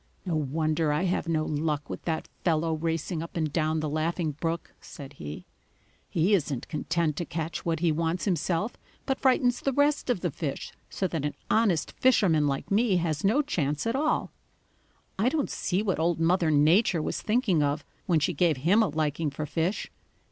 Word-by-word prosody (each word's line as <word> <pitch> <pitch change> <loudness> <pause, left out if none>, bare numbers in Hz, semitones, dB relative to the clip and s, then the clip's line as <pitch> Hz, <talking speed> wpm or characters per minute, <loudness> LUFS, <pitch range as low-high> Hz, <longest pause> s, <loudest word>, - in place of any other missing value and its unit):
"No 175 -3 -1
wonder 155 +1 0
I 150 +4 +1
have 180 -2 0
no 160 -2 +1
luck 150 -1 -1
with - - -7
that 160 -2 -2 0.2
fellow 165 -1 +1
racing 165 +1 -2
up 165 +1 -7
and 155 -3 -1
down 155 -1 +1
the 155 - -1
Laughing 155 +2 -1
Brook," 165 +3 -4
said 140 -2 -10
he. 75 - -8 0.6
"He 175 +5 +2
isn't 145 -9 0
content 160 0 -1
to - - -1
catch 165 0 -4
what 165 -2 -1
he 170 -2 +3
wants 165 +3 -1
himself, 185 +2 -1 0.3
but 270 - -1
frightens 250 -2 +3
the 275 - +1
rest 285 +1 +1
of 240 -8 +1
the 175 - -1
fish 145 -1 -4 0.2
so 190 - -1
that 160 -4 -3
an 145 -1 -2 0.2
honest 210 -8 +2
fisherman 180 - +3
like 140 +5 -3
me 205 -2 +3
has 160 -3 -1
no 230 +10 +3
chance 150 - -1
at 230 +2 0
all. 300 +3 0 0.9
I 225 +5 +3
don't 300 -1 -1
see 190 +3 -1
what 190 -6 0
Old 165 0 +1
Mother 170 0 +3
Nature 160 +4 +4
was - - -3
thinking 210 - +2
of 145 0 0 0.2
when 170 -4 +3
she 150 - 0
gave 160 -1 +2
him 175 - +3
a 215 - +2
liking 155 0 -1
for 145 +2 -5
fish. 165 +6 -2
165 Hz, 190 wpm, -27 LUFS, 155-190 Hz, 0.9 s, Nature